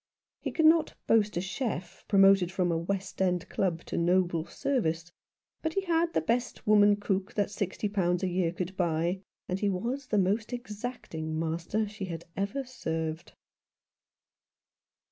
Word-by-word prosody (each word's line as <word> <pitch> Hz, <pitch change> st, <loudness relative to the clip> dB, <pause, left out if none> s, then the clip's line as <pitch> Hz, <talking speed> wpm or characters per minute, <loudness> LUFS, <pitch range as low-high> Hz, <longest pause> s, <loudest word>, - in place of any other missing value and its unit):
He -, -, -3 dB
could 320 Hz, -, +1 dB
not 320 Hz, 0 st, +5 dB
boast 210 Hz, -4 st, +3 dB
a -, -, +1 dB
chef, 195 Hz, -1 st, -4 dB
promoted 195 Hz, -3 st, +5 dB
from 180 Hz, -2 st, +1 dB
a 165 Hz, -, +1 dB
West 190 Hz, +3 st, -3 dB
End 180 Hz, -1 st, +1 dB
Club 175 Hz, -3 st, -1 dB
to -, -, -4 dB
noble 175 Hz, -1 st, +2 dB
service; 170 Hz, -, -1 dB, 0.5 s
but 320 Hz, 0 st, -2 dB
he 390 Hz, -, +2 dB
had 335 Hz, -2 st, +1 dB
the -, -, +3 dB
best 235 Hz, +9 st, -1 dB
woman 205 Hz, -1 st, +6 dB
cook 195 Hz, -2 st, -2 dB
that 205 Hz, -1 st, +1 dB
sixty 200 Hz, 0 st, -2 dB
pounds 180 Hz, -3 st, 0 dB
a -, -, +2 dB
year 180 Hz, -2 st, +1 dB
could 180 Hz, +1 st, -4 dB
buy, 175 Hz, +1 st, 0 dB, 0.3 s
and 185 Hz, +1 st, -2 dB
he 205 Hz, -, +1 dB
was 240 Hz, +8 st, -2 dB
the 215 Hz, -, +1 dB
most 205 Hz, +5 st, +1 dB
exacting 210 Hz, -9 st, -5 dB
master 165 Hz, +7 st, -1 dB
she 205 Hz, -1 st, -6 dB
had 170 Hz, -2 st, -6 dB
ever 200 Hz, +8 st, -1 dB
served. 160 Hz, -9 st, -4 dB
195 Hz, 160 wpm, -29 LUFS, 175-215 Hz, 0.5 s, woman